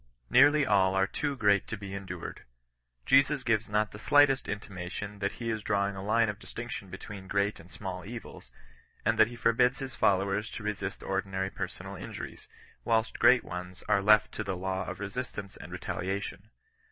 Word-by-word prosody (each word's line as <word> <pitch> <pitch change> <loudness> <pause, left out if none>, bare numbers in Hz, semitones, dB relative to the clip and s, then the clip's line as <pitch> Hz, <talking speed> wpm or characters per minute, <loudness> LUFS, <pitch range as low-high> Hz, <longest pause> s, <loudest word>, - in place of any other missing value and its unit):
Nearly 150 0 +6
all 95 -5 +3
are 95 0 +4
too 145 +7 -2
great 100 -5 +3
to 115 - -4
be 100 -1 -7
endured. 100 -1 -6 0.6
Jesus 135 +1 +4
gives 110 -4 +1
not 105 0 +1
the 105 - -10
slight 145 +3 +6
est 135 - -3
intimation 100 0 -6
that 100 0 -1
he 115 -1 -3
is 110 -1 -2
drawing 100 -1 0
a 95 - -5
line 110 +3 +3
of 105 0 -4
distinction 115 -4 -7
between 95 +1 -8
great 100 +2 0
and 85 - -14
small 90 -1 -6
evils; 115 +3 -9 0.6
and - - +2
that 110 - +8
he 120 - -8
forbids 120 +3 +3
his 135 -1 -6
followers 100 +2 +2
to 110 - -7
resist 105 -1 -3
ordinary 95 0 -2
persoiud - - -6
injuries, - - -8 0.4
whDst 115 0 +1
great 125 0 +6
ones 90 0 -7
are 105 -2 +3
left 105 +1 +5
to - - -4
the 95 -2 -3
law 95 0 -2
of - - -5
resistance 105 -1 -5
and - - -10
retaliation. 100 +2 -4
105 Hz, 180 wpm, -30 LUFS, 95-115 Hz, 0.6 s, that